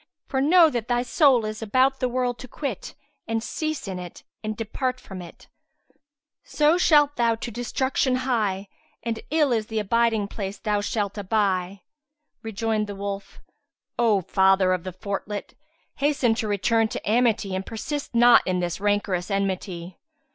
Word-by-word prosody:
For 265 - -1
know 325 +2 +6
that 240 -3 -3
thy 245 -1 +1
soul 255 -2 +4
is 215 +1 -5
about 260 +5 +2
the 255 - 0
world 245 -1 -1
to 255 - -9
quit 300 - -5 0.3
and 225 0 -1
cease 310 +1 -3
in 185 -2 -4
it 175 -1 -9 0.2
and 215 -1 -3
depart 255 +3 -2
from 190 -6 -9
it; 175 - -13 1.0
so 300 +2 +3
shalt 295 -4 +4
thou 235 -1 +3
to 230 +1 -6
destruction 255 +3 0
hie 205 -6 0 0.4
and 230 -1 -2
ill 300 -3 +2
is 220 -2 0
the 220 - -4
abiding 220 0 +1
place 200 -1 -5
thou 210 -2 -1
shalt 205 0 -2
aby!"[FN#153] 195 -2 0 0.6
Rejoined 220 0 -1
the 205 - -6
wolf, 200 0 -6 0.6
"O 220 -5 +3
Father 190 0 +3
of 180 -1 -3
the 185 - -4
Fortlet, 200 +2 -5 0.4
hasten 275 -5 +2
to 225 -1 -2
return 220 +3 +2
to - - -6
amity 220 -3 +2
and 190 +1 -2
persist 245 +6 -5
not 240 0 +7
in 185 -1 +1
this 175 0 -2
rancorous 205 -3 0
enmity. 190 -3 -3
220 Hz, 160 wpm, -24 LUFS, 195-250 Hz, 1.0 s, not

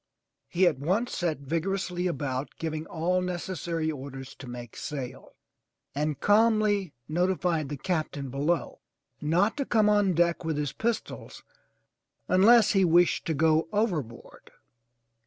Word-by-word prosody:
He 180 +2 +2
at 155 -7 +2
once 195 - 0
set 160 -5 -1
vigorously 180 +4 -2
about 140 -4 -3
giving 160 -1 -4
all 175 +3 0
necessary 175 -3 -3
orders 135 -2 -8
to 135 -2 -9
make 120 -2 -8
sail, 130 -3 -7 0.6
and 150 0 -2
calmly 210 -4 +3
notified 175 -2 0
the 145 - -4
Captain 150 -5 -3
below 150 +6 -1 0.4
not 175 +8 +2
to 280 - 0
come 215 -2 +3
on 205 -3 +3
deck 170 +1 +2
with 160 -2 -2
his 145 -2 -2
pistols 230 0 -4 0.8
unless 210 +4 +6
he 195 -1 +3
wished 175 0 +3
to 160 - 0
go 160 +2 +3
overboard! 175 - -3
170 Hz, 130 wpm, -27 LUFS, 145-190 Hz, 0.8 s, unless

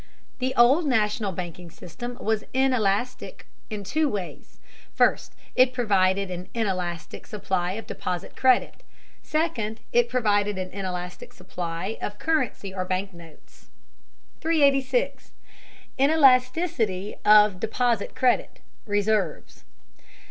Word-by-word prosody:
The 260 0 -1
old 270 +7 +5
national 210 -4 +1
banking 175 -1 -7
system 240 +10 -8
was 220 -1 -1
inelastic 250 -2 0 0.2
in 210 -2 -5
two 300 +9 0
ways: 200 -7 -6 0.4
first, - - +2 0.2
it 255 0 +5
provided 195 -4 +2
an 180 +1 -6
inelastic 185 -6 -3
supply 190 -4 -2
of 225 +3 -6
deposit 180 -1 -5
credit; 255 -2 +2 0.4
second, 250 -9 -2
it 240 0 +3
provided 205 -4 +1
an 185 0 -4
inelastic 180 -2 -6
supply 180 +2 -5
of 205 - -4
currency 260 -10 -1
or 185 -1 -2
bank 185 +1 -3
notes. 165 -2 -17 0.7
386. 310 - +1 0.7
INELASTICITY 255 - +3
OF 210 -3 +6
DEPOSIT 230 0 -1
CREDIT 255 -1 +1 0.3
(RESERVES). 205 -4 -1
210 Hz, 105 wpm, -25 LUFS, 185-255 Hz, 0.7 s, OF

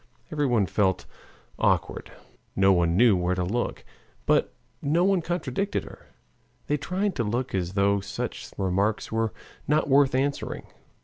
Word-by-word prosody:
Everyone 130 -9 +2
felt 95 +1 0 0.5
awkward, - - 0 0.4
none 90 -3 +3
knew 115 -2 +6
where 90 0 0
to 90 - -1
look, 115 +7 -2 0.4
but - - +2 0.3
no 160 +5 +2
one 195 -1 +3
contradicted 175 +3 -2
her. - - -13 0.6
They 150 - 0
tried 190 +6 -1
to 120 - +1
look 120 +5 -2
as 90 -1 -1
though 100 0 +2
such 105 +5 -5
remarks 100 +3 0
were 115 0 0 0.4
not 150 +1 +2
worth 135 -1 +4
answering. 140 +2 -2
115 Hz, 135 wpm, -26 LUFS, 95-145 Hz, 0.6 s, knew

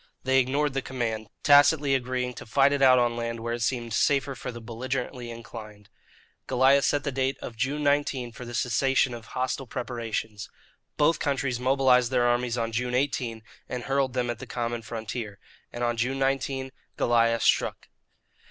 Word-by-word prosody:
They 130 0 +3
ignored 140 +3 +1
the 135 - -1
command, 115 -5 -3
tacitly 145 0 +5
agreeing 125 -1 -1
to - - -10
fight 140 +4 +4
it 140 - -1
out 130 -1 +7
on 120 -1 +2
land 115 0 -3
where 115 +1 -2
it 120 - -4
seemed 120 -1 -1
safer 140 +1 +2
for 125 - -6
the 120 - -8
belligerently 125 +2 -4
inclined. 110 -3 -10 0.6
Goliah 135 +2 +4
set 145 +1 +1
the 140 - -2
date 135 +1 -1
of 115 - -7
June 140 +6 -1
19 140 -4 +1
for 115 - -10
the 120 0 -7
cessation 130 +2 +2
of 115 -1 -8
hostile 130 +1 -2
preparations. 115 -3 -4 0.5
Both 165 +3 +3
countries 135 -4 -1
mobilized 130 -1 +3
their 125 -2 +2
armies 120 0 +1
on 115 -1 -1
June 125 +2 -1
18, 125 -4 -1 0.3
and 125 -1 -4
hurled 135 -1 0
them 125 -2 0
at 120 - -7
the - - -8
common 120 -1 -3
frontier. 110 -2 -6 0.3
And 120 - -4
on 120 -1 0
June 125 +3 0
19, 135 0 -1 0.3
Goliah 115 -1 +3
struck. - - +1
125 Hz, 175 wpm, -27 LUFS, 115-135 Hz, 0.6 s, out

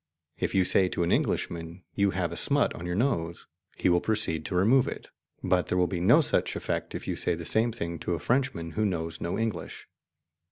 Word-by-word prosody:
If - - -1
you 95 -1 +4
say 95 0 +4
to 85 - -1
an 85 - 0
Englishman, 85 +1 -1
"You 100 -1 +2
have 90 -3 -1
a - - -5
smut 140 +9 +1
on 85 - -7
your 90 - -2
nose," 85 -8 -1 0.3
he - - +1
will 85 -1 +4
proceed 105 -8 -1
to 85 - -3
remove 115 +9 +4
it, - - -7 0.3
but 90 -1 +2
there 90 - 0
will 90 - +4
be 90 0 -3
no 115 - +6
such - - 0
effect - - -3
if - - -6
you - - -1
say 85 - 0
the 85 0 -7
same 115 +6 +2
thing 85 -7 -5
to 90 - -1
a - - -5
Frenchman 100 - 0
who 110 - -1
knows 80 -4 -2
no 85 - -2
English. 115 -1 -4
90 Hz, 225 wpm, -28 LUFS, 85-110 Hz, 0.3 s, no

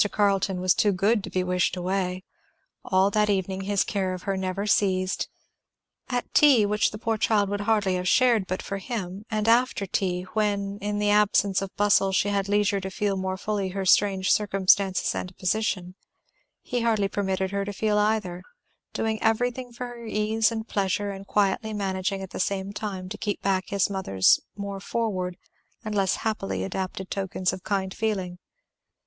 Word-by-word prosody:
Carleton 195 -2 +1
was 185 -1 +4
too 205 - +2
good 200 +3 +1
to - - -6
be 185 - 0
wished 180 0 0
away. 185 0 -2 0.6
All 190 +1 +2
that 210 0 +2
evening 190 -1 -1
his 200 -1 +2
care 190 -3 -2
of 180 - -10
her 195 - -1
never 190 +1 -2
ceased. 190 -2 +1 0.8
At 245 -1 -3
tea, 270 -8 +6
which 210 +1 +2
the 210 - -8
poor 225 0 -1
child 205 -2 +2
would 205 0 -2
hardly 205 -3 +1
have 180 0 -3
shared 235 -3 +4
but 185 - -3
for 195 -1 -4
him, 200 -2 -5
and 215 -1 -1
after 235 -3 +3
tea, 180 -1 -1
when 205 -2 -1
in 205 0 -2
the 205 0 +2
absence 205 -2 +3
of 195 - -4
bustle 200 -1 +3
she 190 +1 +2
had 200 -1 -1
leisure 205 -1 +2
to 190 - -4
feel 200 +1 -1
more 190 0 -2
fully 200 -1 -2
her 190 +1 -3
strange 190 0 +3
circumstances 195 -2 +2
and 185 0 -6
position, 185 -2 -1 0.7
he 245 - -2
hardly 220 -4 +2
permitted 190 -1 -1
her 200 0 -1
to 205 - -4
feel 210 +1 +1
either, 210 -4 0 0.5
doing 220 -1 -1
everything 245 +3 0
for 245 +1 -6
her 240 -1 -9
ease 220 +1 +1
and 220 0 -4
pleasure 200 0 -1
and 195 0 -9
quietly 205 +2 +1
managing 195 -1 -2
at 190 - -9
the - - -6
same 195 +1 -1
time 195 -4 -5
to - - -7
keep 205 -1 -2
back 190 -1 +1
his 200 -2 +2
mother's 185 - +3 0.2
more 200 -1 -5
forward 190 -4 -2 0.5
and 215 - -3
less 195 -2 +2
happily 215 -3 -2
adapted 190 0 -4
tokens 190 -1 -1
of 185 - -6
kind 190 -2 -2
feeling. 190 -5 -2
200 Hz, 180 wpm, -26 LUFS, 190-210 Hz, 0.8 s, tea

